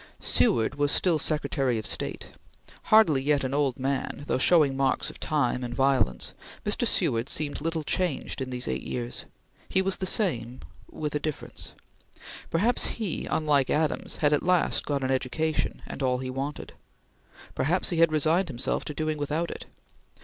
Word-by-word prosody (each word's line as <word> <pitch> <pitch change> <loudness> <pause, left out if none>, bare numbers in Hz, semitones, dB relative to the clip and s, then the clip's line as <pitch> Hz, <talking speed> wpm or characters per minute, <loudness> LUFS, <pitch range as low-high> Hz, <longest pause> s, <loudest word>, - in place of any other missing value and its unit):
Seward 115 +2 +3
was 145 0 +3
still 170 -4 +3
Secretary 135 -6 0
of 110 - -4
State. 85 -3 -3 0.6
Hardly 190 -11 +5
yet 145 0 +2
an 130 0 -2
old 140 -3 +1
man, 135 +2 -2
though 130 - 0
showing 150 -2 +4
marks 135 -1 0
of - - -14
time 130 -5 0
and 120 0 -4
violence, 130 - +1 0.3
Mr. - - +1
Seward 115 +3 +1
seemed 145 -2 -1
little 165 0 -2
changed 170 -3 -1
in 130 - -3
these 125 0 -3
eight - - -2
years. 120 -1 -5 0.4
He - - +2
was 195 0 0
the 190 - -2
same 130 - -1 0.3
with 150 -1 -4
a 150 - 0
difference. 155 -1 -5 0.8
Perhaps 220 +9 +1
he 210 -8 -3
unlike 145 -4 +2
Henry 155 - +2
Adams 155 - -2
had 150 -1 +2
at 145 - +2
last 180 -1 +2
got 140 -2 -1
an 130 - 0
education, 150 +4 -1
and - - -7
all 130 -1 +2
he 130 0 -4
wanted. 135 +3 -5 0.8
Perhaps 175 +8 0
he 170 - -1
had 165 -1 +5
resigned 160 +5 +2
himself 130 -4 -2
to 150 - -5
doing 155 0 -1
without 150 +4 -1
it. - - -8
145 Hz, 170 wpm, -27 LUFS, 130-160 Hz, 0.8 s, Hardly